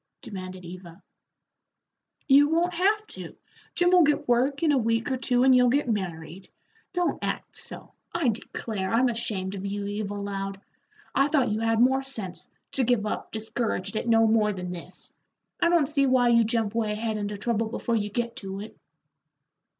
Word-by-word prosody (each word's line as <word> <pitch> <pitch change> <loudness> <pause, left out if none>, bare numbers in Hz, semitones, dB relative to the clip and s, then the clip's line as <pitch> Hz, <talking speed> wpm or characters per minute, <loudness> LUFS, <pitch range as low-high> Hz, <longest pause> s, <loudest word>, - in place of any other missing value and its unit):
demanded 185 -2 -8
Eva. 175 +1 -11 1.2
"You 285 +1 +6
won't 340 +3 +1
have 410 +5 +2
to. - - -10 0.4
Jim 355 0 +3
will 365 -1 +7
get 295 -1 +2
work 265 +5 +2
in 315 - +4
a 285 - +3
week 230 +2 0
or 260 - 0
two, 250 -1 +1
and 260 -1 +6
you'll 250 -1 +5
get 280 +2 +1
married. 185 -4 -4 0.4
Don't 355 -1 -1
act - - -4
so. - - -10 0.2
I 340 -7 +1
declare, 210 -3 -4
I'm 245 +3 +3
ashamed 205 -5 -3
of 195 -1 -6
you, 200 0 -3
Eva 205 0 -3
Loud. 195 -1 -4 0.5
I 275 - +3
thought 285 -5 +2
you 210 +1 -1
had 225 0 +1
more 260 +2 +4
sense, 220 -10 -3 0.2
to 265 - 0
give 240 -3 +2
up 210 - -4
discouraged 220 -3 -3
at 220 - -2
no 225 -1 +5
more 220 -1 +3
than 180 -2 -5
this. 175 -2 -8 0.5
I 340 - +4
don't 340 -4 +4
see 280 -1 +1
why 255 -2 +4
you 235 -1 +5
jump 225 -2 0
way 220 -2 0
ahead 220 0 -2
into 205 0 -3
trouble 225 +1 -1
before 235 0 -2
you 210 -2 -1
get 235 +2 -3
to 195 -1 -6
it." 215 - -9
225 Hz, 180 wpm, -26 LUFS, 205-265 Hz, 1.2 s, will